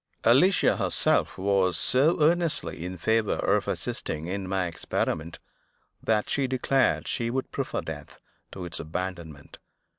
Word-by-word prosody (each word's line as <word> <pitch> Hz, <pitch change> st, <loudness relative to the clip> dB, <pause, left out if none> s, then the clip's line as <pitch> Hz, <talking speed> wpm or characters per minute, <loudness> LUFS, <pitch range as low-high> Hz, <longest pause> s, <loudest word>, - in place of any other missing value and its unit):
Alicia 175 Hz, +12 st, +4 dB
herself -, -, +1 dB
was 95 Hz, -2 st, +2 dB
so 145 Hz, +7 st, +3 dB
earnestly 155 Hz, -, +1 dB
in 90 Hz, +1 st, -5 dB
favor 110 Hz, +4 st, +1 dB
of -, -, +1 dB
assisting 80 Hz, +1 st, -3 dB
in 95 Hz, +2 st, -4 dB
my 95 Hz, -1 st, 0 dB
experiment, 80 Hz, 0 st, -2 dB, 0.6 s
that 110 Hz, -1 st, +1 dB
she 140 Hz, -2 st, 0 dB
declared 130 Hz, +1 st, +1 dB
she 115 Hz, -1 st, -1 dB
would 130 Hz, +2 st, -3 dB
prefer -, -, -2 dB
death -, -, -8 dB, 0.3 s
to 95 Hz, -2 st, -7 dB
its 85 Hz, -, -4 dB
abandonment. 80 Hz, -2 st, -6 dB
95 Hz, 130 wpm, -27 LUFS, 85-130 Hz, 0.6 s, Alicia